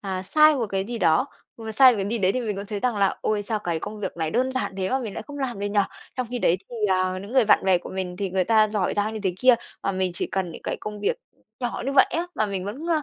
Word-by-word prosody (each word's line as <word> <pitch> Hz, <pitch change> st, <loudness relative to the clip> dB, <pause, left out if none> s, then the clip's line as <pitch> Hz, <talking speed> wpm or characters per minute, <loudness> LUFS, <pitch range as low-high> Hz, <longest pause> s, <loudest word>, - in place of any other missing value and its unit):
ờ, 190 Hz, -2 st, -3 dB
sai 305 Hz, +8 st, +5 dB
một 240 Hz, -5 st, -1 dB
cái 195 Hz, 0 st, -1 dB
gì 235 Hz, +1 st, -5 dB
đó, 165 Hz, -, +3 dB, 0.3 s
mà 220 Hz, -1 st, -6 dB
sai 255 Hz, +3 st, +7 dB
một -, -, -2 dB
cái 195 Hz, -, -3 dB
gì 235 Hz, -, 0 dB
đấy 190 Hz, -1 st, +2 dB
thì 255 Hz, -, -1 dB
mình 210 Hz, -4 st, -3 dB
cũng 200 Hz, +1 st, -5 dB
thấy 205 Hz, -1 st, -4 dB
rằng 245 Hz, -4 st, 0 dB
là 195 Hz, -1 st, +2 dB
"Ôi, 210 Hz, -1 st, 0 dB
sao 215 Hz, +1 st, -1 dB
cái 170 Hz, -5 st, -2 dB
công 210 Hz, 0 st, -6 dB
việc 195 Hz, -, -4 dB
này 160 Hz, -1 st, -1 dB
đơn 260 Hz, +2 st, 0 dB
giản 260 Hz, -6 st, -2 dB
thế 190 Hz, -1 st, -1 dB
mà 265 Hz, -, +2 dB
mình 225 Hz, -6 st, -5 dB
lại -, -, -5 dB
không 290 Hz, 0 st, -8 dB
làm 255 Hz, -6 st, -3 dB
được 205 Hz, -, -2 dB
nhỉ?" 205 Hz, 0 st, +2 dB, 0.4 s
Trong 255 Hz, -, -1 dB
khi 245 Hz, -, -2 dB
đấy 180 Hz, -6 st, +3 dB
thì, 240 Hz, -, -7 dB, 0.2 s
ờ, 185 Hz, 0 st, 0 dB
những 200 Hz, +4 st, -9 dB
người 260 Hz, -3 st, +5 dB
bạn 210 Hz, -, +4 dB
bè 185 Hz, -2 st, +4 dB
của -, -, -10 dB
mình 185 Hz, -1 st, -4 dB
thì 195 Hz, -2 st, -3 dB
người 185 Hz, 0 st, +1 dB
ta 215 Hz, +1 st, +4 dB
giỏi 205 Hz, -3 st, 0 dB
giang 210 Hz, +2 st, 0 dB
như 220 Hz, -, -4 dB
thế 185 Hz, -2 st, 0 dB
kia, 255 Hz, -1 st, +7 dB, 0.3 s
mà 195 Hz, -, 0 dB
mình 185 Hz, -1 st, 0 dB
chỉ -, -, -2 dB
cần 190 Hz, -2 st, -2 dB
những -, -, -11 dB
cái -, -, -3 dB
công 210 Hz, -1 st, -6 dB
việc 465 Hz, -, 0 dB, 0.4 s
nhỏ 240 Hz, -1 st, -3 dB
như 275 Hz, -, 0 dB
vậy 270 Hz, -, +6 dB
á, 340 Hz, +2 st, -1 dB
mà 215 Hz, -, +1 dB
mình 195 Hz, -2 st, -4 dB
vẫn, 255 Hz, -, -6 dB
à, 310 Hz, -2 st, +2 dB
210 Hz, 320 wpm, -24 LUFS, 190-245 Hz, 0.4 s, sai